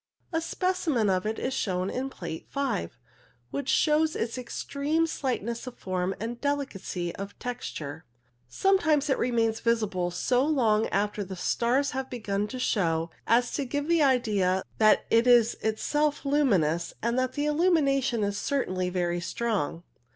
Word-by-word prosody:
A 325 Hz, -, +1 dB
specimen 330 Hz, -, 0 dB
of 185 Hz, +2 st, 0 dB
it 220 Hz, -, -2 dB
is 260 Hz, -, -2 dB
shown 185 Hz, -5 st, -1 dB
in 265 Hz, +2 st, -3 dB
Plate 170 Hz, -9 st, -7 dB
5, 250 Hz, -, -2 dB, 0.5 s
which 280 Hz, -1 st, -3 dB
shows 310 Hz, +1 st, +3 dB
its 230 Hz, 0 st, -2 dB
extreme 280 Hz, +5 st, -1 dB
slightness 245 Hz, -6 st, -3 dB
of 255 Hz, -, -8 dB
form 185 Hz, 0 st, -2 dB
and 235 Hz, +3 st, -5 dB
delicacy 205 Hz, -11 st, -2 dB
of 200 Hz, +1 st, -7 dB
texture. 160 Hz, -, -5 dB, 0.4 s
Some 385 Hz, -, +2 dB
times 300 Hz, -4 st, +2 dB
it -, -, +1 dB
remains 225 Hz, -2 st, +1 dB
visible 215 Hz, -6 st, 0 dB
so 245 Hz, +8 st, +1 dB
long 230 Hz, -8 st, +2 dB
after 205 Hz, +1 st, -1 dB
the 190 Hz, 0 st, -7 dB
stars 245 Hz, +9 st, +1 dB
have 265 Hz, 0 st, -4 dB
begun 210 Hz, -4 st, -2 dB
to 255 Hz, -, -6 dB
show 165 Hz, -9 st, 0 dB, 0.2 s
as 240 Hz, +2 st, +3 dB
to 285 Hz, -, -1 dB
give 285 Hz, +3 st, -3 dB
the 335 Hz, -1 st, +3 dB
idea 210 Hz, -9 st, +2 dB, 0.2 s
that 215 Hz, -1 st, +5 dB
it 230 Hz, +2 st, +4 dB
is 240 Hz, -2 st, +5 dB, 0.2 s
self 295 Hz, +4 st, 0 dB
luminous, 190 Hz, -, +2 dB
and 235 Hz, +2 st, +1 dB
the 255 Hz, +3 st, -1 dB
illusion 280 Hz, -, +2 dB
is 200 Hz, 0 st, -1 dB
certainly 185 Hz, -10 st, -1 dB
very 175 Hz, -1 st, -1 dB
strong. 195 Hz, -5 st, -2 dB
235 Hz, 150 wpm, -27 LUFS, 195-280 Hz, 0.5 s, that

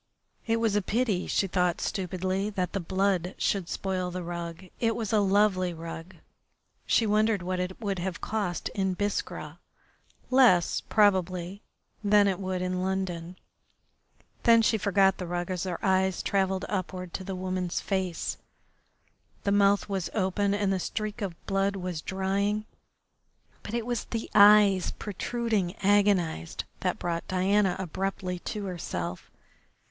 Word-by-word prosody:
It 230 Hz, 0 st, +2 dB
was 225 Hz, -3 st, +1 dB
a 205 Hz, -, +3 dB
pity, 210 Hz, -2 st, 0 dB
she -, -, +1 dB
thought 180 Hz, -2 st, +1 dB
stupidly, 190 Hz, +1 st, -2 dB
that 185 Hz, -4 st, -2 dB
the 200 Hz, -, 0 dB
blood 185 Hz, 0 st, 0 dB
should 195 Hz, -4 st, 0 dB
spoil 185 Hz, -2 st, -2 dB
the 180 Hz, 0 st, -5 dB
rug. 170 Hz, +1 st, -6 dB
It 225 Hz, -1 st, +1 dB
was 225 Hz, -2 st, -3 dB
a 215 Hz, -, +5 dB
lovely 195 Hz, -3 st, +2 dB
rug. 165 Hz, +2 st, -8 dB, 0.7 s
She 230 Hz, -, +3 dB
wondered 215 Hz, -2 st, +2 dB
what 185 Hz, 0 st, -2 dB
it 180 Hz, +1 st, -3 dB
would 200 Hz, -4 st, -2 dB
have 180 Hz, -1 st, -3 dB
cost 205 Hz, -5 st, -2 dB
in 190 Hz, -2 st, -1 dB
Biskra 205 Hz, +1 st, -3 dB, 0.7 s
less, 245 Hz, -10 st, +5 dB
probably, 190 Hz, -2 st, +2 dB, 0.4 s
than 205 Hz, 0 st, +5 dB
it 190 Hz, -1 st, 0 dB
would 185 Hz, -1 st, -2 dB
in 185 Hz, 0 st, -1 dB
London. 185 Hz, -2 st, -2 dB, 1.1 s
Then 230 Hz, -1 st, +6 dB
she 220 Hz, 0 st, +2 dB
forgot 195 Hz, -1 st, +3 dB
the 180 Hz, -, -4 dB
rug 175 Hz, +1 st, -3 dB
as 180 Hz, 0 st, -2 dB
her 180 Hz, -2 st, -2 dB
eyes 190 Hz, -1 st, +2 dB
travelled 190 Hz, -1 st, 0 dB
upward 185 Hz, -2 st, -4 dB
to 190 Hz, -, -4 dB
the 190 Hz, 0 st, -4 dB
woman's 185 Hz, -1 st, -2 dB
face. 190 Hz, -4 st, -2 dB, 1.1 s
The 200 Hz, -, +1 dB
mouth 200 Hz, 0 st, +4 dB
was 195 Hz, -3 st, -2 dB
open 200 Hz, 0 st, +1 dB
and 200 Hz, -1 st, +1 dB
the 190 Hz, -, 0 dB
streak 215 Hz, +4 st, -4 dB
of 190 Hz, -4 st, -3 dB
blood 195 Hz, 0 st, +1 dB
was 180 Hz, -4 st, -4 dB
drying, 200 Hz, +3 st, -1 dB, 1.0 s
but 225 Hz, -, -5 dB
it 235 Hz, -2 st, -1 dB
was 240 Hz, -2 st, -2 dB
the 225 Hz, -1 st, -5 dB
eyes, 205 Hz, -2 st, +7 dB
protruding, 210 Hz, -2 st, -2 dB
agonised, 195 Hz, -, +2 dB, 0.2 s
that -, -, -1 dB
brought 170 Hz, -1 st, -3 dB
Diana 190 Hz, +1 st, +2 dB
abruptly 190 Hz, 0 st, -3 dB
to 210 Hz, +3 st, -5 dB
herself. 90 Hz, -, -5 dB
190 Hz, 145 wpm, -28 LUFS, 180-205 Hz, 1.1 s, eyes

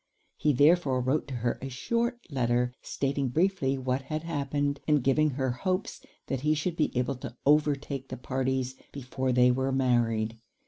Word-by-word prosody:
He 150 Hz, -, +2 dB
therefore 145 Hz, -1 st, +4 dB
wrote 130 Hz, +5 st, 0 dB
to 135 Hz, -, -5 dB
her 120 Hz, -, 0 dB
a 135 Hz, -, -4 dB
short 235 Hz, -, -2 dB
letter, 125 Hz, -2 st, +1 dB
stating 140 Hz, -1 st, -1 dB
briefly 155 Hz, -2 st, +1 dB
what 130 Hz, 0 st, -1 dB
had 155 Hz, +3 st, -4 dB
happened, 145 Hz, -3 st, -1 dB
and 150 Hz, -4 st, +3 dB
giving 155 Hz, +4 st, +3 dB
her 130 Hz, -1 st, -1 dB
hopes 185 Hz, +10 st, -2 dB, 0.2 s
that 135 Hz, -2 st, -3 dB
he 150 Hz, +2 st, +2 dB
should 165 Hz, +3 st, -2 dB
be 155 Hz, -, +1 dB
able 125 Hz, +1 st, 0 dB
to 125 Hz, -2 st, -8 dB
overtake 145 Hz, -2 st, +2 dB
the -, -, -5 dB
parties 130 Hz, 0 st, -1 dB, 0.2 s
before 130 Hz, -1 st, -3 dB
they 125 Hz, 0 st, +5 dB
were 130 Hz, +2 st, 0 dB
married. 115 Hz, -4 st, +1 dB
135 Hz, 170 wpm, -28 LUFS, 125-150 Hz, 0.2 s, they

